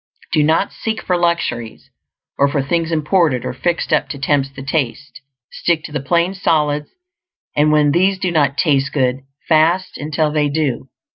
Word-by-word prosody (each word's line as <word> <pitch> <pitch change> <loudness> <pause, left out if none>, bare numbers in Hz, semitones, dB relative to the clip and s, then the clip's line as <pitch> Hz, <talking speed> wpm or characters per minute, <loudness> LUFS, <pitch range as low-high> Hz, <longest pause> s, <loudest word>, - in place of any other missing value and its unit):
Do 155 - +3
not 160 +6 +1
seek 220 -1 -3
for 180 - 0
luxuries, 170 -10 -2 0.5
or 140 - +5
for 140 -1 -1
things 165 +3 -1
imported 155 -4 +1
or - - -3
fixed 170 +5 -1
up 150 -2 +1
to 145 - -5
tempt 135 -1 0
the 135 - -7
taste; 145 -1 -3 0.3
stick 165 -2 0
to - - -8
the 150 - -2
plain 170 +7 +1
solids; 150 -6 0 0.7
and 150 +1 +3
when 150 -1 +4
these 190 +5 +2
do 185 -2 -1
not 145 -4 +1
"taste 140 -5 +2
good," 130 -2 +1 0.3
fast 165 +4 +2
until 150 +1 -1
they 150 -1 +1
do. 140 -4 -2
150 Hz, 170 wpm, -18 LUFS, 140-170 Hz, 0.7 s, or